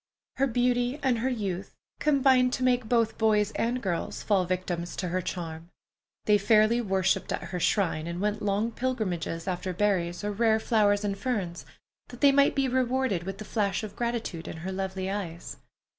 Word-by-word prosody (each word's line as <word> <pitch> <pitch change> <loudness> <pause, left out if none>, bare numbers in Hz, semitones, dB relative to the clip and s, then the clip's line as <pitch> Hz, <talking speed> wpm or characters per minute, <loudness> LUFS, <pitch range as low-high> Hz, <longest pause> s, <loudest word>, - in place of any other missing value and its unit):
Her 275 +1 +3
beauty 245 +2 +1
and 250 -4 +2
her 255 +3 0
youth 200 -7 -4 0.2
combined 265 -3 +4
to 255 - -1
make 250 -3 +2
both 230 -2 +1
boys 215 -2 +3
and 240 +3 -1
girls 175 -4 -3
fall 195 -4 +2
victims 175 -1 -3
to 180 - -3
her 185 +2 -1
charm. 165 -2 -6 0.6
They 210 -1 +4
fairly 215 +3 +4
worshipped 190 -3 0
at - - -2
her 180 - -4
shrine, 170 -4 +1
and 170 +1 -4
went 210 +2 -1
long 205 +3 0
pilgrimages 195 -10 -2
after 185 0 -2
berries 180 -2 0
or 210 - -1
rare 220 +1 +2
flowers 210 -3 +2
and 200 -1 -1
ferns, 195 -5 -3 0.4
that 245 - -12
they 280 - +7
might 280 0 +4
be 275 -1 +2
rewarded 255 -7 0
with 195 0 -5
the 215 - -8
flash 200 -2 -1
of 215 - -7
gratitude 235 -8 -3
in - - -6
her 190 - -2
lovely 190 0 -3
eyes. 175 - -5
210 Hz, 180 wpm, -28 LUFS, 185-240 Hz, 0.6 s, they